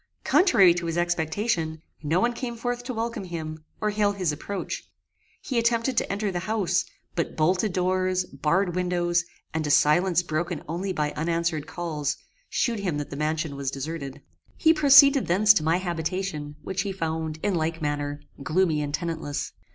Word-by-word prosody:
Contrary 225 Hz, -, +5 dB
to 170 Hz, -1 st, -3 dB
his 165 Hz, 0 st, -2 dB
expectation, 175 Hz, 0 st, 0 dB, 0.2 s
no 160 Hz, +4 st, +1 dB
one 240 Hz, +4 st, +2 dB
came 240 Hz, -1 st, -4 dB
forth 245 Hz, +1 st, -3 dB
to 250 Hz, -, -4 dB
welcome 230 Hz, -3 st, -3 dB
him, 160 Hz, -3 st, -6 dB, 0.2 s
or 210 Hz, 0 st, 0 dB
hail 205 Hz, -1 st, +2 dB
his 185 Hz, -5 st, 0 dB
approach. 190 Hz, +7 st, -5 dB, 0.5 s
He 255 Hz, -4 st, 0 dB
attempted 235 Hz, +2 st, +1 dB
to -, -, +1 dB
enter 200 Hz, 0 st, -1 dB
the 175 Hz, -, -2 dB
house, 185 Hz, -2 st, 0 dB, 0.3 s
but 170 Hz, -, -2 dB
bolted 185 Hz, +6 st, +2 dB
doors, 185 Hz, 0 st, +1 dB
barred 170 Hz, +6 st, 0 dB
windows, 175 Hz, -1 st, +1 dB, 0.3 s
and 160 Hz, -1 st, -1 dB
a -, -, -2 dB
silence 170 Hz, +4 st, +4 dB
broken 170 Hz, -1 st, -2 dB
only 180 Hz, +5 st, -2 dB
by 150 Hz, -4 st, -1 dB
unanswered 165 Hz, -1 st, -1 dB
calls, 155 Hz, -5 st, -3 dB, 0.3 s
shewed 230 Hz, -3 st, 0 dB
him 180 Hz, -7 st, -1 dB
that 145 Hz, -, -5 dB
the -, -, -5 dB
mansion 155 Hz, 0 st, -1 dB
was 140 Hz, -1 st, -2 dB
deserted. 140 Hz, 0 st, -6 dB, 0.3 s
He 320 Hz, 0 st, +5 dB
proceeded 280 Hz, -2 st, +7 dB
thence 205 Hz, +4 st, +6 dB
to 160 Hz, -, +1 dB
my 160 Hz, +2 st, +3 dB
habitation, 170 Hz, -3 st, -3 dB
which 190 Hz, 0 st, -2 dB
he 200 Hz, -1 st, -3 dB
found, 160 Hz, -3 st, -3 dB
in 205 Hz, -, +1 dB
like 165 Hz, -1 st, -1 dB
manner, 145 Hz, -1 st, -2 dB, 0.2 s
gloomy 160 Hz, -1 st, +2 dB
and 145 Hz, -1 st, -3 dB
tenantless. 160 Hz, -4 st, -4 dB
175 Hz, 170 wpm, -26 LUFS, 155-200 Hz, 0.5 s, proceeded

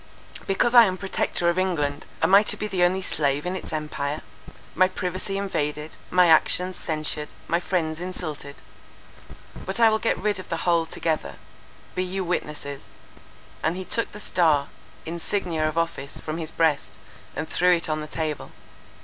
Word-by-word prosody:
Because 215 Hz, +5 st, +2 dB
I 240 Hz, -2 st, +10 dB
am 185 Hz, -2 st, -1 dB
Protector 190 Hz, -2 st, 0 dB
of 170 Hz, +2 st, +3 dB
England, 150 Hz, -6 st, -1 dB, 0.2 s
am 170 Hz, +4 st, +4 dB
I 200 Hz, -, +10 dB
to 210 Hz, -, -1 dB
be -, -, -3 dB
the 190 Hz, -4 st, -1 dB
only 185 Hz, +2 st, +3 dB
slave 145 Hz, -3 st, 0 dB
in 180 Hz, +1 st, -1 dB
its -, -, -6 dB
empire? 150 Hz, -1 st, -3 dB, 0.5 s
My 185 Hz, +2 st, +5 dB
privacy 185 Hz, +1 st, -3 dB
invaded, 150 Hz, -6 st, -2 dB
my 180 Hz, 0 st, +5 dB
actions 180 Hz, +3 st, +4 dB
censured, 155 Hz, -2 st, -3 dB, 0.2 s
my 170 Hz, -, +2 dB
friends 170 Hz, -3 st, -1 dB
insulted? 155 Hz, -6 st, -6 dB, 1.0 s
But 190 Hz, +4 st, -3 dB
I 230 Hz, -1 st, +7 dB
will 220 Hz, -, +2 dB
get 230 Hz, -, +1 dB
rid 205 Hz, -2 st, 0 dB
of 185 Hz, -, -9 dB
the 165 Hz, -, -2 dB
whole 170 Hz, -2 st, +3 dB
together.—Be 165 Hz, +3 st, -4 dB
you 190 Hz, +1 st, -2 dB
witnesses," 150 Hz, -5 st, -3 dB, 0.8 s
and 160 Hz, +2 st, +1 dB
he 185 Hz, 0 st, -5 dB
took 230 Hz, -, 0 dB
the 210 Hz, -, -9 dB
star, 155 Hz, -8 st, +2 dB, 0.4 s
insignia 165 Hz, -1 st, -1 dB
of 155 Hz, -, -7 dB
office, 165 Hz, -4 st, -2 dB
from 155 Hz, +1 st, -4 dB
his 160 Hz, -1 st, -3 dB
breast, 145 Hz, -, +1 dB, 0.4 s
and 160 Hz, -, -3 dB
threw 180 Hz, 0 st, +4 dB
it 170 Hz, -, -3 dB
on 155 Hz, -1 st, -1 dB
the 150 Hz, -, -6 dB
table. 155 Hz, -1 st, -3 dB
170 Hz, 165 wpm, -25 LUFS, 155-185 Hz, 1.0 s, I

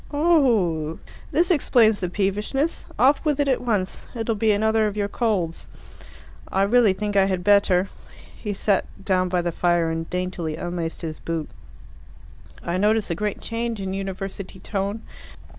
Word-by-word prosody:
"Oho! 230 Hz, -, +2 dB, 0.3 s
This 350 Hz, +4 st, +2 dB
explains 230 Hz, -, +4 dB
the 180 Hz, -, -2 dB
peevishness. 210 Hz, -, -1 dB
Off 270 Hz, +4 st, +4 dB
with 295 Hz, -2 st, 0 dB
it 285 Hz, -, +2 dB
at 265 Hz, -, +1 dB
once. 210 Hz, -6 st, -2 dB
It'll 225 Hz, 0 st, -1 dB
be 220 Hz, +1 st, +2 dB
another 220 Hz, +1 st, +2 dB
of 210 Hz, 0 st, -4 dB
your 205 Hz, -1 st, 0 dB
colds." 200 Hz, -7 st, -1 dB, 0.8 s
"I 195 Hz, -, +2 dB
really 220 Hz, -1 st, +4 dB
think 205 Hz, +1 st, -3 dB
I 195 Hz, -1 st, +5 dB
had 185 Hz, -2 st, -1 dB
better." 200 Hz, -2 st, +4 dB, 0.5 s
He 210 Hz, -, -5 dB
sat 200 Hz, 0 st, +1 dB, 0.2 s
down 185 Hz, -2 st, +2 dB
by 180 Hz, -1 st, 0 dB
the 175 Hz, -, -1 dB
fire 170 Hz, -1 st, +1 dB
and 165 Hz, 0 st, -4 dB
daintily 180 Hz, -3 st, -3 dB
unlaced 170 Hz, 0 st, -4 dB
his 155 Hz, -2 st, -5 dB
boot. 165 Hz, -2 st, -4 dB, 1.1 s
"I 170 Hz, +1 st, -1 dB
notice 210 Hz, 0 st, +2 dB
a -, -, +2 dB
great 210 Hz, +3 st, -3 dB
change 230 Hz, -1 st, -3 dB
in 190 Hz, -1 st, -3 dB
university 195 Hz, 0 st, -5 dB
tone. 200 Hz, +3 st, -3 dB
200 Hz, 160 wpm, -23 LUFS, 180-225 Hz, 1.1 s, I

